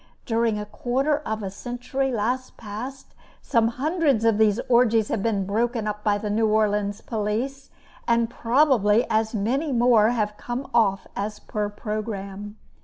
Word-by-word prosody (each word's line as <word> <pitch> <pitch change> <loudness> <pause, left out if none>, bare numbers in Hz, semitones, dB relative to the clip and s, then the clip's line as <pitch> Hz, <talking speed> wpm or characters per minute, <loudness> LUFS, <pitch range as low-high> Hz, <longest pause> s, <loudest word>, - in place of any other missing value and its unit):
During 230 -2 +1
a 210 - -4
quarter 260 +8 0
of 220 -7 -4
a 195 - -4
century 250 +5 -3
last 250 +3 -2
past, 240 +5 -8 0.3
some 230 -1 +2
hundreds 280 -1 +1
of 225 -2 +3
these 215 0 +4
orgies 235 -3 +3
have 220 - -1
been 200 -3 0
broken 230 +3 0
up 210 0 -4
by 205 -1 +2
the 210 0 -3
New 220 +1 +2
Orleans 210 -1 +1
police, 230 +5 -3 0.4
and 235 -1 +3
probably 235 -3 +3
as 220 +1 +1
many 260 +9 0
more 235 -3 +4
have 210 -3 -1
come 245 +3 -5
off 200 -5 +2
as 210 +1 -3
per 210 -1 -3
programme. 205 -1 -5
225 Hz, 155 wpm, -24 LUFS, 210-245 Hz, 0.4 s, these